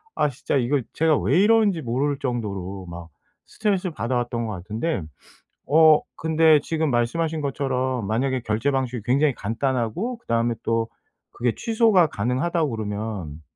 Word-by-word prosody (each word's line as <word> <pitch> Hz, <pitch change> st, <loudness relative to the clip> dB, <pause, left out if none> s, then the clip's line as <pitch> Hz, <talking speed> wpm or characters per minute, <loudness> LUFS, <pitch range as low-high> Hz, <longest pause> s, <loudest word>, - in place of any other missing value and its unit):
아 150 Hz, -1 st, +2 dB
진짜 140 Hz, +2 st, -3 dB
이거 135 Hz, +2 st, +1 dB
제가 160 Hz, -2 st, +3 dB
왜 -, -, +2 dB
이러는지 210 Hz, -5 st, +3 dB
모를 135 Hz, +3 st, -1 dB
정도로 100 Hz, -7 st, -4 dB
막 85 Hz, -1 st, -9 dB, 0.4 s
스트레스 200 Hz, -4 st, -1 dB
받아왔던 120 Hz, -3 st, -2 dB
것 110 Hz, -, -4 dB
같은데, 105 Hz, -, -3 dB, 0.7 s
어 155 Hz, +1 st, +6 dB, 0.2 s
근데 160 Hz, -1 st, +4 dB
지금 160 Hz, -1 st, -1 dB
말씀하신 155 Hz, +7 st, 0 dB
것처럼 130 Hz, -4 st, -1 dB
만약에 130 Hz, +4 st, 0 dB
결제 110 Hz, +6 st, 0 dB
방식이 130 Hz, -4 st, -2 dB
굉장히 140 Hz, +3 st, +3 dB
간단하고 130 Hz, -, -2 dB
그다음에 115 Hz, -, 0 dB
또 115 Hz, 0 st, 0 dB, 0.4 s
그게 120 Hz, -1 st, -1 dB
취소가 220 Hz, -6 st, +3 dB
가능하다고 145 Hz, -, -1 dB
그러면 105 Hz, -7 st, -5 dB
130 Hz, 330 characters per minute, -23 LUFS, 115-160 Hz, 0.7 s, 어